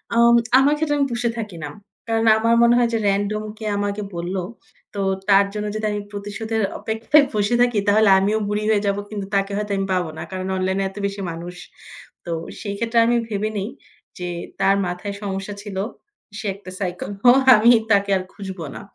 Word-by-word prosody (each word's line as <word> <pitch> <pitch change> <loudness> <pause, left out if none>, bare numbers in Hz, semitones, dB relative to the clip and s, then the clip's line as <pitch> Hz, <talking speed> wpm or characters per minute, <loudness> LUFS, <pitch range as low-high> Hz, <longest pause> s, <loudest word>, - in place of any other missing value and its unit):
আম 235 0 +6 0.3
আমার 285 +2 +4
ক্ষেত্রে 295 -1 0
আমি 280 - +2
পুষে 235 0 0
থাকি 210 -6 -5
না। 150 - -4 0.4
কারণ 225 0 +1
আমার 230 +1 +3
মনে 235 0 +5
হয় 240 -1 +3
যে, - - +2
রেন্ডম 205 +2 -1
কে 220 - -7
আমাকে 205 +1 -2
বলল 175 +2 -3 0.6
তো 200 - -5 0.3
তার 200 0 +6
জন্য 210 0 -3
যদি 215 0 -2
আমি 205 0 -3
প্রতিশোধের 210 +2 -3 0.2
অপেক্ষায় 230 +7 +3
বসে 210 +2 +1
থাকি 245 -3 +3
তাহলে 215 0 +5
আমিও 205 +3 +1
বুড়ি 210 +1 -1
হয়ে 210 -2 +3
যাব। 200 - +1
কিন্তু 205 -2 -5
তাকে 195 0 +1
হয়তো 210 -1 -3
আমি 195 - -1
পাবো 180 -3 0
না 160 - -5
কারণ 185 0 -4
অনলাইনে 190 +1 0
এত 195 - -16
বেশি 200 0 -3
মানুষ। 175 +2 -7 0.7
তো 170 - -5 0.3
সেই 200 -2 -4
ক্ষেত্রে 230 +1 +1
আমি 240 +1 +2
ভেবে 215 0 -2
নেই 200 +2 -3 0.5
যে 180 0 -4 0.3
তার 195 0 +4
মাথায় 180 +3 -4
সমস্যা 195 0 -4
ছিল। 200 -3 -7 0.6
সে 215 - -7
একটা 195 -2 -11
সাইকেল 180 -1 -4
হ্যাঁ, 250 +2 +7 0.2
আমি 215 +2 +5 0.2
তাকে 200 -1 +3
আর 185 - -4
খুঁজবো 190 -5 -7
না। - - -7
205 Hz, 195 wpm, -21 LUFS, 195-225 Hz, 0.7 s, হ্যাঁ